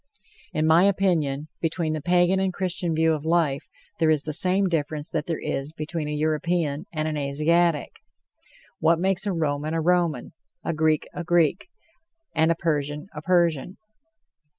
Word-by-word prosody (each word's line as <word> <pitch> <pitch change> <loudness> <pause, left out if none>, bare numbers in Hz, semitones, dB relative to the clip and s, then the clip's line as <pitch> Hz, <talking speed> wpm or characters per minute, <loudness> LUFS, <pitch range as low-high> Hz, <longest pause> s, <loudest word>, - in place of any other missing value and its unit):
In 155 - 0
my 165 +4 +5
opinion, 165 -8 +1
between 165 -1 -1
the 155 - -3
Pagan 175 +3 +3
and 190 -1 +1
Christian 180 -2 -1
view 160 0 +3
of 150 -2 -3
life 160 -4 +1 0.3
there 160 - +3
is 155 -2 +2
the 155 - -4
same 185 +4 +3
difference 155 -2 -2
that 155 -2 -2
there 165 -2 -1
is 140 +3 -3
between 155 0 -4
a - - -3
European 155 +1 -1
and 155 -1 -2
an 155 -1 -2
Asiatic. 150 +3 +1 0.8
What 165 +1 +3
makes 190 +3 0
a - - +1
Roman 155 -2 -1
a - - +1
Roman, 170 -5 0 0.3
a - - 0
Greek 155 -1 +1
a 175 - -5
Greek, 175 - +2 0.7
and 160 +1 +3
a - - +2
Persian 150 0 -2
a 150 - -7
Persian? 170 -1 +1
160 Hz, 165 wpm, -25 LUFS, 150-175 Hz, 0.8 s, my